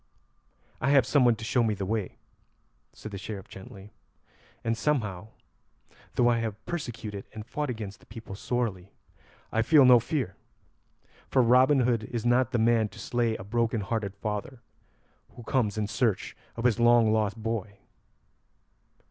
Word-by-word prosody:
"I 135 Hz, -, +1 dB
have 140 Hz, -4 st, +5 dB
someone 125 Hz, -3 st, +4 dB
to 110 Hz, 0 st, -8 dB
show 120 Hz, +2 st, +2 dB
me 110 Hz, -2 st, +1 dB
the 100 Hz, -1 st, -4 dB
way," 105 Hz, -1 st, -3 dB, 0.7 s
said 110 Hz, -, -10 dB
the 100 Hz, -, -6 dB
Sheriff 100 Hz, -1 st, -7 dB
gently; 95 Hz, +1 st, -12 dB, 0.7 s
"and 115 Hz, 0 st, 0 dB
somehow, 110 Hz, -8 st, -1 dB, 0.9 s
though 120 Hz, -, +4 dB
I 120 Hz, -1 st, +3 dB
have 110 Hz, -2 st, -5 dB
persecuted 115 Hz, -, -5 dB
and 110 Hz, -1 st, -8 dB
fought 145 Hz, +4 st, -3 dB
against 110 Hz, -4 st, -6 dB
the -, -, -22 dB
people 110 Hz, -2 st, -9 dB
sorely, 100 Hz, -3 st, -3 dB, 0.6 s
I 115 Hz, -, +2 dB
feel 145 Hz, +3 st, +6 dB
no 125 Hz, -1 st, +8 dB
fear, 120 Hz, -, -3 dB, 0.9 s
for 130 Hz, -, +4 dB
Robin 130 Hz, +4 st, +5 dB
Hood 120 Hz, -3 st, +1 dB
is 115 Hz, 0 st, -4 dB
not 120 Hz, 0 st, +3 dB
the 120 Hz, -, +1 dB
man 115 Hz, -1 st, +3 dB
to -, -, -15 dB
slay 120 Hz, -2 st, -1 dB
a 95 Hz, -, -7 dB
broken 115 Hz, +2 st, 0 dB
hearted 100 Hz, -1 st, -3 dB
father 105 Hz, +5 st, -5 dB, 0.7 s
who 120 Hz, -, -10 dB
comes 110 Hz, -3 st, 0 dB
in 105 Hz, -, 0 dB
search 105 Hz, -1 st, -1 dB, 0.2 s
of 115 Hz, -, -5 dB
his 120 Hz, -2 st, +2 dB
long 120 Hz, -2 st, +5 dB
lost 110 Hz, -1 st, 0 dB
boy." 110 Hz, -3 st, -4 dB
115 Hz, 155 wpm, -28 LUFS, 105-120 Hz, 0.9 s, no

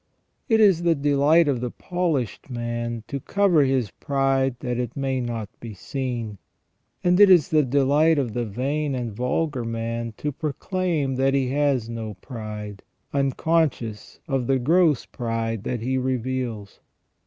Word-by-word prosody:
It 225 Hz, -1 st, +4 dB
is 195 Hz, -6 st, +5 dB
the 170 Hz, -1 st, +3 dB
delight 145 Hz, +3 st, +3 dB
of 130 Hz, -4 st, 0 dB
the 125 Hz, -, -2 dB
polished 160 Hz, -, -2 dB
man 120 Hz, -1 st, -3 dB
to 140 Hz, +3 st, -4 dB
cover 185 Hz, -1 st, +3 dB
his 130 Hz, -6 st, 0 dB
pride 135 Hz, -2 st, 0 dB
that 125 Hz, -1 st, -2 dB
it 125 Hz, 0 st, -4 dB
may 135 Hz, -1 st, -1 dB
not 115 Hz, -3 st, -3 dB
be 115 Hz, -3 st, -8 dB
seen. 120 Hz, -3 st, -4 dB, 0.6 s
And 180 Hz, 0 st, +3 dB
it 205 Hz, -1 st, +8 dB
is 175 Hz, -6 st, +6 dB
the 155 Hz, -1 st, +4 dB
delight 145 Hz, +4 st, +3 dB
of 125 Hz, -6 st, -1 dB
the 120 Hz, -, -1 dB
vain 140 Hz, +6 st, -2 dB
and 120 Hz, -4 st, -3 dB
vulgar 125 Hz, +4 st, -1 dB
man 115 Hz, 0 st, -3 dB
to 150 Hz, -, -2 dB
proclaim 155 Hz, -1 st, -2 dB
that 135 Hz, +1 st, +2 dB
he 135 Hz, -2 st, +1 dB
has 140 Hz, -4 st, +1 dB
no 115 Hz, -3 st, -5 dB
pride, 105 Hz, -2 st, -7 dB, 0.3 s
unconscious 140 Hz, -5 st, 0 dB
of 135 Hz, -5 st, -1 dB
the 135 Hz, -, +3 dB
gross 155 Hz, +2 st, +3 dB
pride 115 Hz, -3 st, -3 dB
that 120 Hz, -3 st, -2 dB
he 130 Hz, +2 st, 0 dB
reveals. 125 Hz, -4 st, -3 dB
130 Hz, 155 wpm, -24 LUFS, 115-145 Hz, 0.6 s, it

